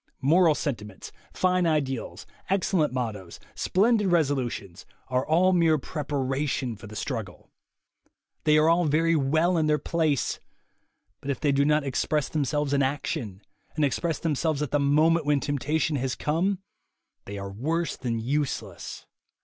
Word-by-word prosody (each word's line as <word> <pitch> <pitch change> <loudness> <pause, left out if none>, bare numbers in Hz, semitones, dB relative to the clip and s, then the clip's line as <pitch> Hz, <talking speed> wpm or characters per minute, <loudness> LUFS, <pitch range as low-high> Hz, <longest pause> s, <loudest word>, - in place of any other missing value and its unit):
Moral 165 +2 +5
sentiments, 105 -10 -5 0.2
fine 185 -1 +1
ideals, 140 -6 -2 0.2
excellent 185 -4 +1
mottoes, 110 -8 -4
splendid 210 +2 +2
resolutions, 135 - -1 0.3
are 130 0 +1
all 180 +5 +3
mere 165 -3 +4
preparation 135 -3 -2
for 110 +1 -11
the 110 - -10
struggle. 110 -7 -5 0.9
They 150 0 +4
are 155 +1 +4
all 170 +1 +4
very 165 +3 +2
well 160 +5 +2
in 155 - +1
their 150 0 +3
place, 155 -4 0 0.8
but 140 - -7
if 140 - -1
they 145 - +2
do 140 +1 +2
not 150 0 +3
express 140 +2 -1
themselves 145 -1 -1
in 140 - +3
action, 130 - -2 0.3
and 155 -2 +2
express 160 +3 -1
themselves 155 -1 0
at 145 - -4
the 145 - +2
moment 155 +3 +3
when 145 -1 +3
temptation 150 +2 -1
has 130 -1 -2
come, 180 +6 -1 0.6
they 100 +1 -6
are 100 0 -6
worse 160 +11 -2
than 120 -3 -3
useless. 120 - -3
145 Hz, 145 wpm, -26 LUFS, 130-160 Hz, 0.9 s, Moral